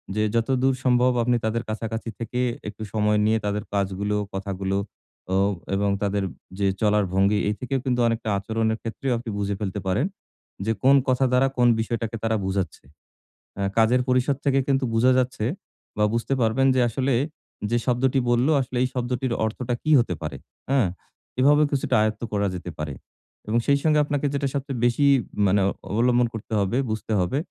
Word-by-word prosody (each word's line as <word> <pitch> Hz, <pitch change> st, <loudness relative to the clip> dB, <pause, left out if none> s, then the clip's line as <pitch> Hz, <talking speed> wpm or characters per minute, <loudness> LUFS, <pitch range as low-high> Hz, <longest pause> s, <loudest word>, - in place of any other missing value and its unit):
যে, 105 Hz, -, +1 dB
যতদূর 130 Hz, +3 st, +2 dB
সম্ভব 125 Hz, 0 st, +4 dB
আপনি 120 Hz, +1 st, +2 dB
তাদের 115 Hz, +1 st, -1 dB
কাছাকাছি 110 Hz, +1 st, -4 dB
থেকে 115 Hz, +2 st, -3 dB, 0.3 s
একটু 105 Hz, +1 st, -7 dB
সময় 105 Hz, -1 st, +2 dB
নিয়ে 110 Hz, +1 st, +3 dB
তাদের 105 Hz, +1 st, -1 dB
কাজগুলো, 100 Hz, +1 st, -1 dB, 0.2 s
কথাগুলো 95 Hz, 0 st, -2 dB, 0.6 s
অ -, -, +3 dB, 0.4 s
এবং 100 Hz, +1 st, +1 dB
তাদের 100 Hz, -1 st, 0 dB, 0.4 s
যে 100 Hz, -, +2 dB
চলার 105 Hz, -1 st, +3 dB
ভঙ্গি 100 Hz, +2 st, +3 dB
এই 105 Hz, -, -1 dB
থেকেও 135 Hz, +1 st, -2 dB
কিন্তু 125 Hz, -2 st, 0 dB
অনেকটা 115 Hz, -1 st, -1 dB
আচরণের 110 Hz, +2 st, -1 dB
ক্ষেত্রেও 125 Hz, +4 st, -3 dB
আপনি 115 Hz, 0 st, -6 dB
বুঝে 100 Hz, 0 st, -1 dB
ফেলতে 100 Hz, -1 st, -3 dB
পারেন। 100 Hz, -, +1 dB, 0.6 s
যে 110 Hz, -, +1 dB
কোন 135 Hz, +2 st, +6 dB
কথা 130 Hz, +1 st, +3 dB
দ্বারা 125 Hz, +1 st, +4 dB
কোন 120 Hz, -1 st, +5 dB
বিষয়টাকে 115 Hz, 0 st, -2 dB
তারা 110 Hz, 0 st, +1 dB
বুঝাচ্ছে। 95 Hz, -4 st, -3 dB, 0.7 s
অ্যা 100 Hz, -, -2 dB
কাজের 115 Hz, +3 st, +4 dB
পরিষদ 130 Hz, +2 st, +2 dB
থেকে 135 Hz, -1 st, +3 dB
কিন্তু 135 Hz, -1 st, +2 dB
বুঝা 120 Hz, +3 st, +4 dB
যাচ্ছে 130 Hz, -3 st, 0 dB, 0.5 s
বা 105 Hz, -, +2 dB
বুঝতে 115 Hz, +3 st, -1 dB
পারবেন 120 Hz, +4 st, +3 dB
যে -, -, +3 dB
আসলে 130 Hz, +3 st, 0 dB, 0.6 s
যে 120 Hz, -, +3 dB
শব্দটি 130 Hz, +2 st, +2 dB
বলল, 120 Hz, +2 st, +3 dB
আসলে 125 Hz, -1 st, -4 dB
এই -, -, +2 dB
শব্দটির 125 Hz, 0 st, -2 dB
অর্থটা 120 Hz, +3 st, -3 dB
কি 155 Hz, -, +1 dB
হতে 120 Hz, -6 st, 0 dB
পারে। 75 Hz, -3 st, -5 dB, 0.3 s
হ্যাঁ? 135 Hz, -7 st, +3 dB, 0.5 s
এভাবে 145 Hz, +3 st, +5 dB
কিছুটা 140 Hz, -2 st, 0 dB
আয়ত্ত 110 Hz, 0 st, 0 dB
করা 100 Hz, 0 st, +1 dB
যেতে 90 Hz, 0 st, -6 dB
পারে 75 Hz, -2 st, -4 dB, 0.5 s
এবং 110 Hz, +2 st, +1 dB
সেই 140 Hz, -, +5 dB
সঙ্গে 155 Hz, -1 st, +4 dB
আপনাকে 145 Hz, 0 st, -1 dB
যেটা 140 Hz, 0 st, 0 dB
সবচেয়ে 140 Hz, -3 st, -3 dB
বেশি 120 Hz, +4 st, +2 dB, 0.4 s
মানে 100 Hz, +1 st, +3 dB, 0.3 s
অবলম্বন 120 Hz, +3 st, +3 dB
করতে 110 Hz, 0 st, -7 dB
হবে, 100 Hz, +4 st, 0 dB
বুঝতে 110 Hz, 0 st, -3 dB
হবে 90 Hz, +9 st, 0 dB
115 Hz, 170 wpm, -24 LUFS, 105-130 Hz, 0.7 s, কোন